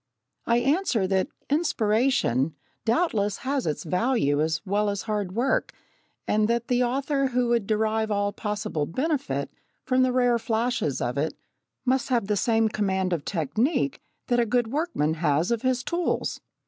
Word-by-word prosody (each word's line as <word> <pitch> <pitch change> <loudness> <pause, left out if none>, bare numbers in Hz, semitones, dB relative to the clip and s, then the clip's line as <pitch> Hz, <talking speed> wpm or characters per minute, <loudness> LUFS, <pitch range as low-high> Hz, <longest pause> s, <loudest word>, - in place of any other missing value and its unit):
I 235 - +4
answer 270 - +1
that 190 0 +1 0.2
"inspiration" 220 - +1 0.3
doubtless 225 - +1
has 275 -4 0
its 150 - -2
value 180 - +1
as 160 0 0
well 205 +2 +1
as 200 0 -3
hard 205 -4 -2
work, 245 +5 0 0.5
and 210 0 +2
that 235 +1 -1
the 245 0 +2
author 275 +2 0
who 250 -1 0
would 235 -4 +1
derive 220 0 +1
all 205 -1 0
possible 210 -8 -2
benefit 255 - -2 0.3
from 255 0 +2
the 255 0 +3
rare 245 -1 +3
flashes 225 - -1
of 125 +3 -1
it 155 +3 -1 0.5
must 260 +1 +1
have 240 -5 +2
the 210 +1 0
same 225 +1 +2
command 190 -4 0
of 160 -4 -3
technique 245 - 0 0.2
that 245 -2 +1
a 235 - +3
good 235 0 +1
workman 290 - 0
has 155 +4 +2
of 235 -2 0
his 255 -1 0
tools. 345 +4 -1
220 Hz, 160 wpm, -26 LUFS, 190-255 Hz, 0.5 s, I